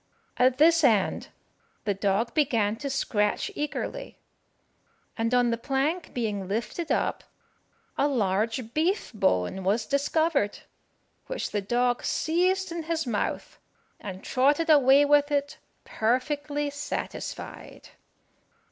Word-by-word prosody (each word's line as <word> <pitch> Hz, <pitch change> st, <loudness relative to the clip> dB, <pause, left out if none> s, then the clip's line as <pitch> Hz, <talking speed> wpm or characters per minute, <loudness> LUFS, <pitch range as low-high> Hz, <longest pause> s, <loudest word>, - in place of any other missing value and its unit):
At 255 Hz, +1 st, +3 dB
this 325 Hz, +2 st, +5 dB
end 220 Hz, -8 st, +2 dB, 0.6 s
the 205 Hz, -, 0 dB
dog 200 Hz, +4 st, 0 dB
began 230 Hz, -9 st, +1 dB
to 280 Hz, +3 st, -4 dB
scratch 210 Hz, -6 st, 0 dB
eagerly; 300 Hz, +11 st, -4 dB, 1.0 s
and 230 Hz, 0 st, -1 dB
on 245 Hz, -1 st, +3 dB
the 230 Hz, -, -2 dB
plank 280 Hz, +7 st, -1 dB
being 210 Hz, -5 st, -3 dB
lifted 230 Hz, -, -3 dB
up, -, -, 0 dB, 0.8 s
a 280 Hz, -, +4 dB
large 225 Hz, -1 st, -1 dB
beef 340 Hz, 0 st, 0 dB
bone 190 Hz, -, 0 dB
was 210 Hz, +4 st, +1 dB
discovered, 280 Hz, -5 st, +1 dB, 0.7 s
which -, -, -4 dB
the 205 Hz, -, -1 dB
dog 245 Hz, +4 st, 0 dB
seized 365 Hz, +3 st, 0 dB
in 340 Hz, 0 st, -3 dB
his 330 Hz, -1 st, -1 dB
mouth, 225 Hz, -5 st, -3 dB, 0.4 s
and 190 Hz, -2 st, -8 dB
trotted 290 Hz, +5 st, +2 dB
away 280 Hz, -1 st, +6 dB
with 290 Hz, 0 st, +4 dB
it 285 Hz, 0 st, -1 dB, 0.3 s
perfectly 290 Hz, +5 st, -1 dB
satisfied. 285 Hz, +1 st, -6 dB
260 Hz, 115 wpm, -27 LUFS, 220-295 Hz, 1.0 s, away